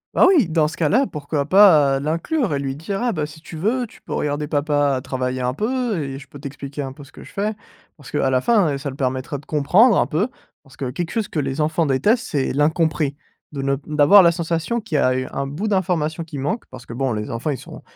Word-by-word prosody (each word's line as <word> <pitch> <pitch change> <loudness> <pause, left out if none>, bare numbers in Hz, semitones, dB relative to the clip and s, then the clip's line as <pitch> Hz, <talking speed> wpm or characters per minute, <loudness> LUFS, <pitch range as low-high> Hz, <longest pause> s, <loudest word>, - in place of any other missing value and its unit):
Ah - - +6
oui! 330 - +5
Dans 160 -2 +2
ce 160 - -7
cas-là, 220 - +2
pourquoi 145 -1 -3
pas, 155 -8 +6
heu, - - -3
l'inclure? 165 - -1
Et 140 - 0
lui 135 -1 -3
dire: 195 +8 -4
«Ah, 245 - +1
bah, 155 -4 -1
si 155 +1 -12
tu 165 - -9
veux, 235 +8 0
tu - - -18
peux - - -8
regarder 150 0 -1
papa 145 -2 +1
travailler 130 -1 -3
un 125 +1 -1
peu 230 - -1
et 135 -1 -5
je 140 - -13
peux 145 - -12
t'expliquer 140 0 -6
un 135 -1 -6
peu 145 - -12
ce 140 - -16
que - - -12
je - - -14
fais». 210 +1 -1 0.4
Parce 145 -4 -13
qu'à 135 - +1
la 130 - +2
fin, 185 - +2
heu, - - -2
ça 140 0 -5
le - - -10
permettrait 130 +1 -2
de 140 - -18
comprendre 180 - +4
un - - +3
peu, 180 +7 0 0.3
parce 135 - -20
que 130 -2 -3
quelque 165 +5 -3
chose 225 -4 -1
que 155 - -2
les 140 +1 -2
enfants 160 +1 +1
détestent, 210 - +2
c'est 140 -3 -1
l'incompris. 150 0 +1 0.4
De 140 -2 -4
ne 140 0 +1
p 140 - -10
d'avoir 150 +6 +7
la 170 -2 +5
sensation 170 +7 -2
qu'il 170 -8 -2
y - - +3
a, 130 -1 +3
heu, 130 0 -1
un 140 0 -2
bout 160 +11 -4
d'information 170 -5 0
qui 155 -3 -8
manque, 145 - -2
parce 130 -1 -11
que 115 - -8
bon 135 0 -1
les 105 0 -4
enfants 115 +6 -3
ils 140 - -1
sont - - -11
150 Hz, 260 wpm, -21 LUFS, 140-180 Hz, 0.4 s, d'avoir